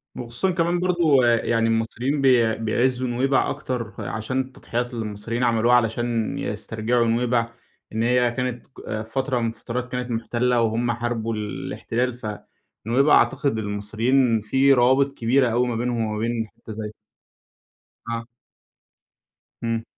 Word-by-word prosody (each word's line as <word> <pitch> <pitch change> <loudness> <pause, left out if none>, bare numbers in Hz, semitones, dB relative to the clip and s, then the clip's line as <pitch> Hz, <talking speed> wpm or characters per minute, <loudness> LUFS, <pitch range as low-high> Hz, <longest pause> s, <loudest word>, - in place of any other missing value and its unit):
وخصوصًا 120 +10 -1
كمان 170 0 +1
برضه 170 -8 +3
يعني 115 -1 +2
المصريين 120 +5 0
بي 120 -4 +4
بيعِزّوا 125 +3 0
نُوَيْبع 130 +3 +1
أكتر، 120 -4 -4
عشان 110 +4 -3
التضحيات 125 -2 -4
اللي 115 -2 -3
المصريين 105 +4 -3
عملوها 120 0 +4
علشان 115 -1 0
يسْترْجعوا 110 +3 -1
نُوَيْبع، 115 0 +1 0.4
إن 110 +1 0
هي 125 0 +3
كانت 125 -1 -3
ك 110 -4 -6
فترة 130 +3 -1
من 115 - 0
الفترات 120 +2 -5
كانت 125 -1 -3
مُحتلة، 120 +1 +1
وهم 115 +1 +1
حاربوا 120 -1 -2
الاحتلال، 115 +3 -3
فنُوَيْبع 120 +4 -1
أعتقد 135 -3 +2
المصريين 110 +4 +1
في 135 +6 +4
روابط 130 +3 +4
كبيرة 125 +2 +3
أوي 120 +2 +1
ما 120 - -2
بينهم 120 -1 -1
وما 110 0 -3
بين 115 0 -1
حتة 115 +1 -13
زي 105 0 -6 1.2
اه. 115 0 -4 1.4
إمم. 115 -1 -1
120 Hz, 130 wpm, -23 LUFS, 115-125 Hz, 1.4 s, بي